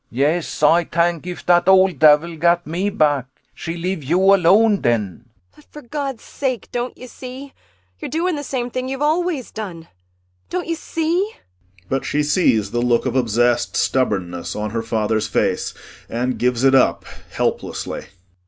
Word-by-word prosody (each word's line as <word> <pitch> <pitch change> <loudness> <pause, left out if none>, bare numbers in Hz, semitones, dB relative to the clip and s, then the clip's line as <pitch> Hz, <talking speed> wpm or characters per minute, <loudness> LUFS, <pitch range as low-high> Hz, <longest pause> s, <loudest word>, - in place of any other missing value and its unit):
CHRIS 115 - -13
Yes, 155 +3 0
Ay 170 +3 +5
tank 170 0 0
if 180 - -7
dat 175 +1 +4
ole 190 -1 +6
davil 155 +2 +4
gat 170 +1 +3
me 175 +6 -1
back 145 - +1 0.3
she 165 +1 -6
leave 180 -1 -3
you 185 +7 +4
alone 200 +4 +5
den. 120 -9 +2
ANNA 105 -4 -4
[Bitterly.] 120 +7 -20 0.3
But, 150 - -19
for 300 - -12
Gawd's 270 -1 -4
sake, 255 -4 -3
don't 245 +1 -3
you 255 - -10
see, 255 +2 -9 0.5
you're - - -5
doing 340 +2 0
the 290 - -4
same 250 -3 -3
thing 255 +1 -3
you've 270 +2 -3
always 315 -3 0
done? 175 -7 -7 0.6
Don't 365 0 -2
you 335 - -1
see? 335 +6 -1 0.5
[But 135 +4 -1
she 150 +1 0
sees 115 - +2
the 120 - 0
look 120 0 +2
of 130 -1 -2
obsessed 120 0 +1
stubbornness 95 -9 -1
on 105 0 -3
her 115 0 -2
father's 110 -1 -1
face - - -1 0.3
and 125 +2 -2
gives 125 0 +1
it 135 0 +5
up 135 - +3 0.2
helplessly. - - -3
170 Hz, 170 wpm, -20 LUFS, -, 0.6 s, ole